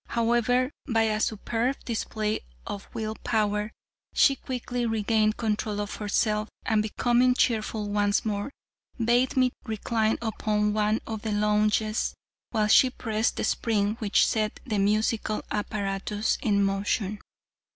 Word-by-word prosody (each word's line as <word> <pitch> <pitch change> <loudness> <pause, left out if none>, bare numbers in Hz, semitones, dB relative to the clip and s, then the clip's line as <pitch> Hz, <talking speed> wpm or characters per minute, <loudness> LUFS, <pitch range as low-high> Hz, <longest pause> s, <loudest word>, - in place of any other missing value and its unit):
However, 240 +3 +2 0.2
by 225 -2 +2
a 215 -1 +1
superb 230 +4 0
display 215 -2 -2 0.3
of 200 - -6
will 220 -1 -3
power, 210 -1 0 0.4
she 275 - +5
quickly 245 -2 -4
regained 215 -1 +1
control 210 -2 -1
of 205 0 -4
herself, 210 0 0 0.2
and 220 -1 +2
becoming 245 +3 +2
cheerful 220 -3 0
once 205 +1 +1
more, 205 +2 -2 0.5
bade 240 +2 +2
me 255 -1 +4
recline 220 -1 0
upon 210 -2 0
one 215 +1 +1
of 220 -2 -5
the 220 - -3
lounges 210 +1 +1 0.3
while 215 -3 +1
she 255 +4 +6
pressed 225 -3 -1
the - - -1
spring 210 -2 +1
which 210 -3 +3
set 215 -1 -1
the 215 -6 -1
musical 215 +1 +1
apparatus 205 0 -1
in 200 -2 +2
motion. 195 +1 -1
215 Hz, 130 wpm, -27 LUFS, 210-230 Hz, 0.5 s, she